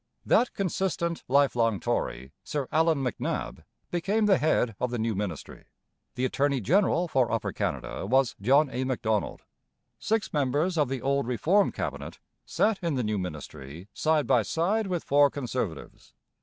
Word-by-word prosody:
That 245 - +3
consistent, 175 -3 -2
life 140 +1 +3
long 115 -4 +1
Tory, 65 -2 -3
Sir 145 -3 -3
Allan 160 -2 +2
MacNab, 125 -5 -3 0.3
became 200 +5 +1
the 195 -3 +4
head 125 -7 +1
of 125 - 0
the 120 - -3
new 115 0 -1
ministry. 95 -6 -5 0.5
The 125 - 0
attorney 140 +1 +1
general 180 - +2
for 130 -6 +1
Upper 115 -1 -1
Canada - - -3
was 130 +1 +2
John 140 +8 +4
A. 125 +1 -2
Macdonald. 110 -5 -1 0.6
Six 220 0 -1
members 150 +5 +1
of 150 -5 +1
the 135 -2 -4
old 140 -2 0
Reform 170 - +2
Cabinet - - -5 0.3
sat 215 -1 +1
in 170 -4 -1
the 125 - 0
new 105 -2 -1
ministry 80 0 -8
side 155 -2 +1
by 120 - +4
side 185 - 0
with 180 -3 -2
four 145 0 +4
Conservatives. 125 - -5
135 Hz, 155 wpm, -27 LUFS, 115-165 Hz, 0.6 s, the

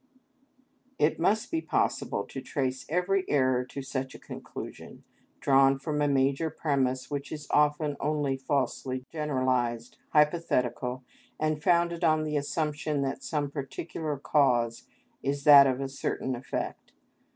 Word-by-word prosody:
_"—It 150 +2 +2
must 215 - +1
be 325 -1 0
possible - - 0
to 135 - -7
trace 130 -1 -3
every 180 +4 +1
error 130 -3 +2
to 140 +2 -7
such 130 0 -4
a - - -10
conclusion, - - -9 0.4
drawn 135 0 +4
from 150 +2 -2
a 145 - +3
major 140 +3 +2
premise 135 -4 -1
which 145 0 -4
is 150 -1 -6
often 150 0 +2
only 145 -3 0
falsely 130 -1 -2
generalised, 130 -6 -1
hypothetical, 130 -5 +1 0.4
and 155 -1 0
founded 170 +1 +2
on 155 -1 +3
the 150 -1 -2
assumption 150 0 -1
that 135 - -3
some 145 -3 -2
particular 150 +2 -4
cause 125 -5 +1 0.3
is 140 +1 -2
that 140 -2 +9
of 130 -1 0
a 135 - -2
certain 135 -1 -3
effect. 125 +1 -5
140 Hz, 135 wpm, -28 LUFS, 130-150 Hz, 0.4 s, that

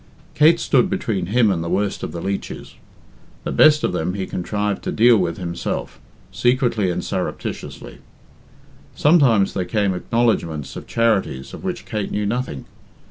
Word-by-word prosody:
Kate 160 +3 +5
stood 190 - +2
between 115 - -2
him 110 +1 +3
and 85 -3 -1
the 85 - -4
worst 100 +3 -1
of - - -4
the 85 - -6
leeches. 100 +1 -5 0.7
The - - -3
best 155 0 +5
of - - 0
them 90 +4 -2
he 95 -2 -3
contrived 105 +3 -2
to - - -1
deal 120 +1 +5
with 90 -5 0
himself, 85 -2 -4 0.3
secretly 115 0 +1
and 90 - -3
surreptitiously. - - -5 1.0
Sometimes 135 - +4
there 95 - -1
came 100 0 0
acknowledgments 90 - -1
of - - -8
charities 105 - 0
of - - -9
which 185 -2 -4
Kate 105 -3 -3
knew 105 - -2
nothing. 115 - -3
105 Hz, 155 wpm, -21 LUFS, 90-120 Hz, 1.0 s, Kate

